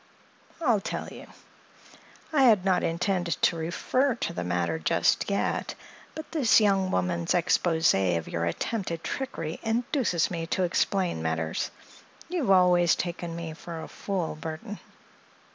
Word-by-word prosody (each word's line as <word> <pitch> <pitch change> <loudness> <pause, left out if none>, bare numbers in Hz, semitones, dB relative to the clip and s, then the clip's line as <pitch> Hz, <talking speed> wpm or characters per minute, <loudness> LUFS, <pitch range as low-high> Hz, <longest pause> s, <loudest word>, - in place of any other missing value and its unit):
"I'll 240 -10 +2
tell - - -4
you. - - -11 1.1
I 290 - +4
had 215 -8 +5
not 185 -2 +2
intended 175 +1 0
to - - +4
refer 225 - 0
to - - -3
the 90 - -3
matter 85 -2 -1
just 80 - +1
yet, 200 - -1 0.4
but 315 - -8
this 275 -10 +5
young 195 -3 +2
woman's 90 - 0
exposé 160 - +2
of 80 - -5
your 85 0 -2
attempted 170 - -3
trickery 215 -12 -4
induces 230 - 0
me 165 -2 -3
to 185 - 0
explain 180 - 0
matters. 80 0 -2 0.6
You 360 0 -1
have 250 - -1
always 180 -3 +5
taken 175 -1 -4
me 165 -1 -5
for 165 +1 -8
a - - -7
fool, 185 -6 -3
Burthon." 160 +7 -7
175 Hz, 145 wpm, -27 LUFS, 155-205 Hz, 1.1 s, had